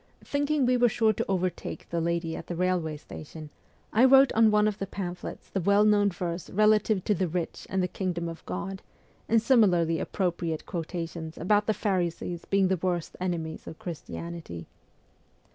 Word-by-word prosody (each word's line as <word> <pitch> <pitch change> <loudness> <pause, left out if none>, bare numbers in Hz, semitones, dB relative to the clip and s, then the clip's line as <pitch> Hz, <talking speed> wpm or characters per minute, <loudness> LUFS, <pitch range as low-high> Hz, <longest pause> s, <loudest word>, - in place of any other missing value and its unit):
Thinking 285 -1 +1
we 250 0 +3
were 245 0 +4
sure 220 0 +2
to - - -2
overtake 185 -2 -2
the 170 -1 0
lady 170 -1 -1
at 165 - -8
the 175 - -4
railway 175 -3 0
station, 155 0 -10 0.4
I 225 - +5
wrote 270 0 +7
on 225 0 +5
one 210 0 +4
of 210 -1 -2
the 195 - -3
pamphlets 180 -2 -6
the 195 - -1
well 200 +4 +4
known 205 -1 +4
verse 175 -1 -4
relative 215 -1 +3
to 210 - +2
the 185 -1 0
rich 170 +1 -4
and 190 -1 0
the - - +1
Kingdom 180 -2 -3
of 165 0 -7
God, 195 -1 -4 0.5
and 230 - +5
similarly 185 -9 +3
appropriate 170 -4 -2
quota 170 -1 -3
tions 160 -1 -8
about 205 +4 +2
the 220 - +2
Pharisees 175 -3 -2
being 195 -1 +2
the 190 0 +1
worst 175 -3 -2
enemies 165 -3 -3
of 160 - -8
Christianity. 170 - -7
185 Hz, 180 wpm, -28 LUFS, 170-210 Hz, 0.5 s, wrote